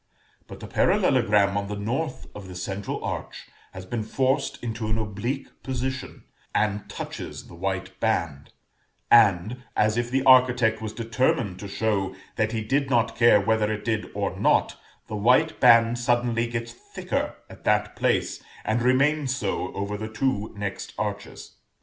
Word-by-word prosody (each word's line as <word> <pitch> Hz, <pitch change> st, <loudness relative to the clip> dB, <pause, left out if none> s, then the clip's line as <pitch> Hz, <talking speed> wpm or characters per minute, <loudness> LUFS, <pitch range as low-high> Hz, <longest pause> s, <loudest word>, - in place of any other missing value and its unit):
But -, -, -11 dB
the -, -, -7 dB
parallelogram 110 Hz, -, +3 dB
on 100 Hz, 0 st, -2 dB
the 105 Hz, -, -4 dB
north 125 Hz, +8 st, -3 dB
of 100 Hz, -2 st, -9 dB
the 90 Hz, -, -9 dB
central 95 Hz, +2 st, -4 dB
arch -, -, -5 dB, 0.3 s
has 95 Hz, 0 st, -9 dB
been 115 Hz, +4 st, -3 dB
forced 130 Hz, +5 st, 0 dB
into 115 Hz, -1 st, -3 dB
an 110 Hz, +1 st, 0 dB
oblique 110 Hz, +6 st, -4 dB
position, 130 Hz, 0 st, -4 dB, 0.3 s
and 105 Hz, -1 st, 0 dB
touches -, -, -7 dB
the -, -, -14 dB
white 95 Hz, +1 st, -4 dB
band; 80 Hz, -10 st, -1 dB, 0.6 s
and, 110 Hz, +3 st, +4 dB
as 110 Hz, +1 st, +2 dB
if 120 Hz, 0 st, -1 dB
the 130 Hz, +1 st, +1 dB
architect 125 Hz, -4 st, +5 dB
was 110 Hz, -1 st, -4 dB
determined 115 Hz, -3 st, 0 dB
to 100 Hz, -, -6 dB
show 100 Hz, -2 st, -1 dB, 0.2 s
that 110 Hz, -1 st, 0 dB
he 110 Hz, -1 st, -2 dB
did 135 Hz, +4 st, 0 dB
not 120 Hz, -3 st, +2 dB
care 120 Hz, -3 st, +6 dB
whether 110 Hz, +1 st, +1 dB
it 105 Hz, -1 st, -4 dB
did 110 Hz, -2 st, -1 dB
or -, -, -2 dB
not, -, -, +2 dB, 0.3 s
the 110 Hz, -, -6 dB
white 125 Hz, +10 st, +3 dB
band 115 Hz, -1 st, +6 dB
suddenly 120 Hz, -1 st, +1 dB
gets 115 Hz, 0 st, -4 dB
thicker 120 Hz, -, -4 dB
at -, -, -14 dB
that -, -, +1 dB
place, -, -, 0 dB, 0.2 s
and 110 Hz, +2 st, +1 dB
remains 135 Hz, +2 st, +2 dB
so 95 Hz, -6 st, -2 dB
over 100 Hz, +1 st, -3 dB
the 110 Hz, +1 st, -5 dB
two 110 Hz, -2 st, -1 dB
next 100 Hz, -1 st, -5 dB
arches. -, -, -5 dB
110 Hz, 160 wpm, -25 LUFS, 100-125 Hz, 0.6 s, care